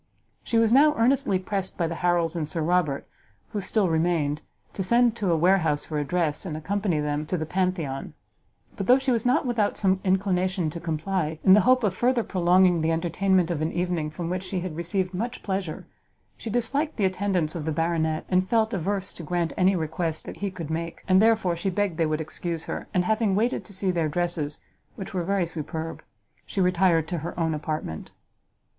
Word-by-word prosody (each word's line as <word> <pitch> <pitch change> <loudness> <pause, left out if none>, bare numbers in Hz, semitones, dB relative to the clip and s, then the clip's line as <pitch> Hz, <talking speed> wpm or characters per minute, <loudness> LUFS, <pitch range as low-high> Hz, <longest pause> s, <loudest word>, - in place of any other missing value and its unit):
She 230 - 0
was 225 0 +4
now 295 +3 +6
earnestly 230 -4 +2
pressed 190 0 -4
by 170 - +1
the 165 - -2
Harrels 175 -2 +1
and 160 -3 -2
Sir 160 +1 -2
Robert, 160 -4 +1 0.4
who 205 - -3
still 200 +1 +1
remained, 160 -3 +1 0.3
to - - -4
send 235 +4 +3
to 200 -5 0
a 165 - +3
warehouse 165 -4 +2
for 155 -2 -3
a - - 0
dress, 155 0 -1
and 160 -6 -4
accompany 190 0 -1
them 150 0 -1
to 180 - -1
the 160 - -3
Pantheon; 175 -6 -2 0.6
but 195 - -4
though 250 - +7
she 265 -1 0
was 235 0 +1
not 250 - +2
without 230 -5 0
some 190 -1 +2
inclination 185 -3 +1
to 170 - -6
comply, 160 0 -2
in 190 - +6
the 200 - +9
hope 255 -1 +5
of 200 -4 +2
further 240 +4 +1
prolonging 180 -2 +3
the 160 - +1
entertainment 175 +2 +1
of 160 -3 -2
an 160 +1 0
evening 175 -3 -1
from 165 +2 -5
which 185 +2 -2
she 185 -1 -3
had 175 -3 -5
received 180 +3 -1
much 235 +7 -4
pleasure, 190 -5 -3 0.5
she 230 - -7
disliked 275 +7 -1
the 205 - +2
attendance 185 -4 0
of 160 -4 -5
the 160 - 0
Baronet, 160 0 0
and 185 0 +1
felt 225 -1 +2
averse 195 +1 -2
to - - -9
grant 170 +1 -1
any 190 +1 +3
request 160 -1 -2
that - - -8
he 200 - -2
could 170 -4 -7
make, 165 +1 -4
and 185 +1 +5
therefore 220 -6 +3
she 170 +3 -2
begged 190 -2 -1
they 165 -2 +2
would 155 +1 -1
excuse 165 +1 -4
her; - - -5
and 180 -1 +1
having 220 -1 +1
waited 230 +5 0
to - - -11
see 190 -1 0
their 165 -3 0
dresses, 160 -2 -2 0.3
which 195 +2 -7
were 180 -2 -1
very 195 0 +1
superb, 165 0 -5 0.4
she - - -5
retired 180 -3 +3
to 175 0 -3
her 170 +3 -6
own 160 -1 +1
apartment. 155 - -4
180 Hz, 205 wpm, -25 LUFS, 160-195 Hz, 0.6 s, the